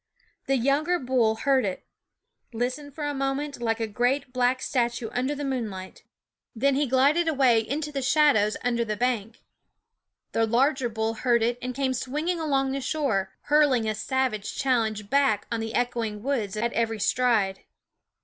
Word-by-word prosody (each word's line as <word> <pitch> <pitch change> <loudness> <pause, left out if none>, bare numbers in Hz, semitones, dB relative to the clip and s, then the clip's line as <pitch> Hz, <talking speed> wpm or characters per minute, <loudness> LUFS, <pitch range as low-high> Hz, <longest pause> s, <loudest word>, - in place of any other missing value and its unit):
The 270 - +2
younger 285 +8 +1
bull 245 -6 +1
heard 265 +3 +2
it; 190 -2 -4 0.7
listened 255 +5 -3
for 300 - -4
a 290 - -1
moment, 275 0 -3
like 225 -1 0
a 225 - 0
great 245 +4 -1
black 250 0 +2
statue 240 -3 -1
under 260 +4 -1
the 290 0 -4
moonlight; 215 -8 -5 0.5
then 275 +5 +2
he 285 +1 +1
glided 280 +7 +3
away 265 -7 +4
into 290 +7 -3
the 275 -2 -3
shadows 260 -6 +3
under 235 -1 +1
the 215 -2 -3
bank. 230 -2 -2 0.9
The 225 0 +1
larger 260 +2 +2
bull 220 0 -2
heard 235 0 +1
it 240 +1 0
and 250 0 -4
came 265 -1 0
swinging 300 +8 -2
along 275 -4 0
the 275 0 -2
shore, 255 -10 -1
hurling 290 -6 +3
a 215 - 0
savage 230 -2 -2
challenge 220 -6 0
back 270 -5 +2
on 230 - -1
the 225 +1 -4
echoing 230 -4 -1
woods 230 -7 -2
at 235 +2 -1
every 225 -1 0
stride. 215 -5 +1
250 Hz, 165 wpm, -26 LUFS, 225-275 Hz, 0.9 s, away